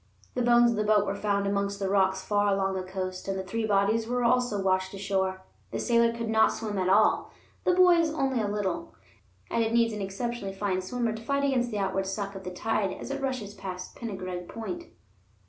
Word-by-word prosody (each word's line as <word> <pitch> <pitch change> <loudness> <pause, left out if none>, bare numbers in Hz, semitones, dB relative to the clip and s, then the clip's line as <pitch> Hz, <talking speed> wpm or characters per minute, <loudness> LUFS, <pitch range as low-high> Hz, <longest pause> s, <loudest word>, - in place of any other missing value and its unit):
The 250 - -1
bones 240 0 +5
of 230 - -2
the 215 - +1
boat 210 -1 +3
were 195 - -1
found 200 0 0
amongst 200 0 0
the 195 -1 -2
rocks 190 -1 +2
far 205 0 +1
along 195 0 +1
the 190 - -2
coast, 185 0 -5
and 195 0 -1
the 190 - -3
three 220 +4 -2
bodies 210 +2 +2
were 245 +1 0
also 240 -3 +2
washed 190 0 0
ashore. 190 -1 -1 0.3
The - - -4
sailor 235 -1 +3
could 230 0 -4
not 220 0 +4
swim 210 -3 -3
at 185 0 +1
all, 210 +3 +4 0.4
the 360 - +4
boys 350 -3 +5
only 270 -5 0
a 210 - 0
little, 200 -5 -3 0.6
and 230 - +2
it 225 0 -1
needs 230 -1 +3
an 210 - -4
exceptionally 195 +1 -4
fine 195 -2 -1
swimmer 230 +4 -2
to 220 - -7
fight 280 +4 0
against 255 -3 +1
the 215 - -3
outward 195 -1 -1
suck 200 +1 -3
of 195 -1 -8
the 180 - -4
tide 200 +1 -1
as - - -7
it 275 0 -3
rushes 255 -7 -3
past 185 -2 -7
Pengareg 185 -5 -5
Point. 340 +10 -6
205 Hz, 215 wpm, -28 LUFS, 195-235 Hz, 0.6 s, bones